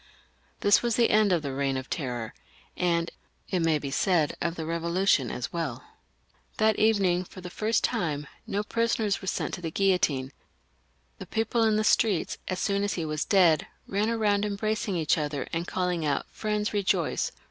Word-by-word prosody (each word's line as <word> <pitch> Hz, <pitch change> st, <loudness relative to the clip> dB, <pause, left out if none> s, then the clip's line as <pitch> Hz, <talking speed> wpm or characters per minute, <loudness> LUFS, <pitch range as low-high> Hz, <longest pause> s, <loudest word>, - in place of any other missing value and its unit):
This 205 Hz, -, +5 dB
was 235 Hz, -2 st, 0 dB
the 235 Hz, -, +3 dB
end 210 Hz, -2 st, +4 dB
of 170 Hz, -4 st, +2 dB
the 140 Hz, -, -3 dB
Eeign 135 Hz, 0 st, -1 dB
of 130 Hz, 0 st, -5 dB
Terror, 125 Hz, -8 st, -4 dB, 0.4 s
and 170 Hz, -1 st, 0 dB, 0.4 s
it 185 Hz, -, 0 dB
may 165 Hz, -2 st, +2 dB
be 140 Hz, -2 st, -5 dB
said 160 Hz, 0 st, +2 dB
of 170 Hz, +2 st, -1 dB
the 160 Hz, -, -4 dB
Eevolution 170 Hz, -, +1 dB
as 125 Hz, -, -5 dB
welL 135 Hz, -8 st, -3 dB, 0.7 s
That 220 Hz, 0 st, +3 dB
evening, 195 Hz, -5 st, +3 dB
for 185 Hz, -, -12 dB
the 180 Hz, -1 st, -8 dB
first 220 Hz, +4 st, 0 dB
time, 155 Hz, -, -1 dB, 0.2 s
no 205 Hz, +1 st, -1 dB
prisoners 225 Hz, -2 st, 0 dB
were 190 Hz, -, -8 dB
sent -, -, -2 dB
to 175 Hz, -, -4 dB
the 165 Hz, -, -3 dB
guillotine; 155 Hz, -8 st, +1 dB, 0.9 s
the -, -, -8 dB
people 225 Hz, +1 st, 0 dB
in 220 Hz, -1 st, +3 dB
the 215 Hz, -, +2 dB
streets, 215 Hz, -5 st, +2 dB
as 185 Hz, -, -2 dB
soon 200 Hz, 0 st, 0 dB
as 205 Hz, -, 0 dB
he 165 Hz, -, -2 dB
was 155 Hz, -1 st, -2 dB
dead, 175 Hz, -6 st, +4 dB, 0.2 s
ran 205 Hz, +3 st, 0 dB
about 210 Hz, -3 st, +1 dB
embracing 210 Hz, 0 st, -1 dB
each 165 Hz, 0 st, +2 dB
other, 145 Hz, -2 st, -3 dB
and 170 Hz, +1 st, -2 dB
calling 180 Hz, -3 st, -1 dB
out, 145 Hz, -2 st, 0 dB
" -, -, -31 dB
Friends, 210 Hz, 0 st, -2 dB
rejoice. 200 Hz, -2 st, 0 dB
180 Hz, 185 wpm, -27 LUFS, 155-210 Hz, 0.9 s, This